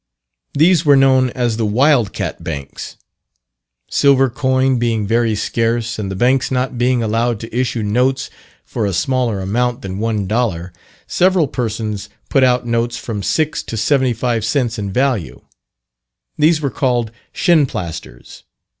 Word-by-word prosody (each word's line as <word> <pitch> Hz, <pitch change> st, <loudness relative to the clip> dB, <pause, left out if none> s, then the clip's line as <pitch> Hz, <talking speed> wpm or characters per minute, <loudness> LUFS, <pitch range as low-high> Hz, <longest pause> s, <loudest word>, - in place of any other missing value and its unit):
These 165 Hz, +2 st, +4 dB
were 145 Hz, -3 st, +5 dB
known 130 Hz, -1 st, +4 dB
as 120 Hz, -3 st, 0 dB
the 115 Hz, -, 0 dB
"Wild 125 Hz, 0 st, +3 dB
Cat -, -, -5 dB
Banks." 70 Hz, -1 st, -7 dB, 0.9 s
Silver 135 Hz, -2 st, +3 dB
coin 130 Hz, -1 st, +1 dB
being 115 Hz, -3 st, 0 dB
very 115 Hz, +1 st, +1 dB
scarce, 115 Hz, +2 st, -1 dB
and 100 Hz, -2 st, -3 dB
the 95 Hz, -, -4 dB
banks 125 Hz, +6 st, +2 dB
not 130 Hz, 0 st, -1 dB
being 125 Hz, 0 st, +1 dB
allowed 115 Hz, +1 st, 0 dB
to 115 Hz, 0 st, -8 dB
issue 125 Hz, -2 st, -1 dB
notes 125 Hz, +5 st, 0 dB, 0.3 s
for 110 Hz, -3 st, -2 dB
a 100 Hz, -, -2 dB
smaller 120 Hz, 0 st, 0 dB
amount 120 Hz, +5 st, -1 dB
than 95 Hz, 0 st, -5 dB
one 110 Hz, -2 st, -1 dB
dollar, 95 Hz, -5 st, -2 dB, 0.3 s
several 185 Hz, -4 st, +2 dB
persons 110 Hz, -5 st, -4 dB, 0.2 s
put 135 Hz, -, +3 dB
out 125 Hz, -1 st, +2 dB
notes 115 Hz, 0 st, -1 dB
from 110 Hz, -4 st, -5 dB
6 155 Hz, +9 st, 0 dB
to 115 Hz, -, -6 dB
75 120 Hz, -1 st, +1 dB
cents 120 Hz, 0 st, -1 dB
in 100 Hz, -1 st, -4 dB
value; 125 Hz, -, -1 dB, 1.0 s
these 155 Hz, +1 st, +3 dB
were 140 Hz, -3 st, -1 dB
called 120 Hz, -3 st, 0 dB, 0.2 s
"Shinplasters." 135 Hz, -, -1 dB
120 Hz, 145 wpm, -17 LUFS, 110-130 Hz, 1.0 s, were